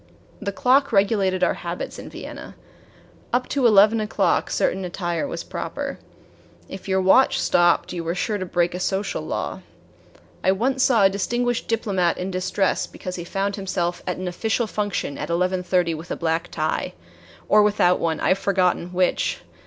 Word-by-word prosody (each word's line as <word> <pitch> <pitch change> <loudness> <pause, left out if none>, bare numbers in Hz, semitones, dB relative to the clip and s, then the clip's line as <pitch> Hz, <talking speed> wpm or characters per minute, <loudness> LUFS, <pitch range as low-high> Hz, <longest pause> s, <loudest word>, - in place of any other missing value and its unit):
The 200 -1 -2
clock 265 +6 +3
regulated 195 -3 +2
our - - +3
habits - - -6
in - - -8
Vienna. - - -9 0.8
Up 250 +1 +1
to 270 -4 +3
eleven 215 +1 +6
o'clock 215 - +1
certain 190 - 0
attire 175 +5 -2
was - - -5
proper. - - -5 0.7
If 190 0 -9
your 190 0 +2
watch 190 +8 +4
stopped 175 +1 +2
you 170 -2 -4
were 165 +1 -2
sure 205 +3 -1
to 185 - -3
break 175 0 +1
a 180 - -4
social 195 +2 -1
law. - - -4 0.8
I 190 - +4
once 260 +6 0
saw 240 -5 +4
a 195 - +7
distinguished 240 +5 -1
diplomat 190 -6 0
in 185 +1 -3
distress 185 +1 0
because 185 0 -7
he 175 - -5
found 195 +3 -2
himself 180 -3 -2
at 180 - -2
an 185 0 -4
official 220 +6 -1
function 205 -9 -3
at - - -4
eleven 180 +2 0
thirty 180 -2 +1
with 160 +3 -8
a - - -2
black 165 +1 -1
tie - - -2 0.5
or 210 - +6
without 205 -4 +3
one, 160 -2 -1
I - - +1
have 190 - +3
forgotten 180 -3 +1
which! 180 0 0
190 Hz, 175 wpm, -23 LUFS, 180-210 Hz, 0.8 s, a